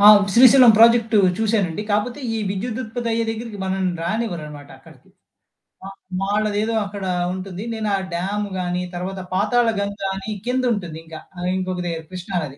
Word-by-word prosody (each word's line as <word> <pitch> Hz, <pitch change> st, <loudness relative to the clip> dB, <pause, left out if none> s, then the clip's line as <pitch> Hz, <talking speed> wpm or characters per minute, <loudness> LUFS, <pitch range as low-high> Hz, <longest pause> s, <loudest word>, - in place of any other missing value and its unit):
అవును. 205 Hz, 0 st, +8 dB
శ్రీశైలం 250 Hz, 0 st, +8 dB
ప్రాజెక్టు 230 Hz, -1 st, +5 dB, 0.2 s
చూసానండి. 210 Hz, -5 st, 0 dB
కాకపోతే 225 Hz, +7 st, -1 dB
ఈ -, -, -1 dB
విద్యుత్ 220 Hz, +4 st, -3 dB
ఉత్పత్తి 235 Hz, +1 st, -4 dB
అయ్యే 230 Hz, 0 st, 0 dB
దగ్గరికి 225 Hz, -1 st, -6 dB
మనల్ని 190 Hz, -1 st, -1 dB
రానివ్వరనమాట 170 Hz, -8 st, -4 dB
అక్కడికి. -, -, -19 dB, 0.8 s
అ -, -, -6 dB, 0.3 s
వాళ్ళదేదో 210 Hz, +2 st, 0 dB
అక్కడ 200 Hz, -1 st, -6 dB, 0.3 s
ఉంటుంది. 190 Hz, +1 st, -6 dB
నేను 220 Hz, -1 st, -2 dB
ఆ -, -, +1 dB, 0.2 s
డ్యామ్ 195 Hz, +4 st, -2 dB
గాని 180 Hz, 0 st, -2 dB
తర్వాత 190 Hz, +2 st, -4 dB
పాతాళ 215 Hz, +5 st, +2 dB
గంగ 200 Hz, 0 st, -3 dB, 0.2 s
అని 195 Hz, +2 st, -6 dB, 0.2 s
కిందుంటుంది. 235 Hz, -10 st, -1 dB
ఇంకా 160 Hz, -1 st, -9 dB, 0.4 s
ఇంకొక 185 Hz, -1 st, -3 dB
దగ్గర 165 Hz, -1 st, -4 dB
కృష్ణానది. 175 Hz, -6 st, -4 dB
205 Hz, 145 wpm, -21 LUFS, 185-225 Hz, 0.8 s, అవును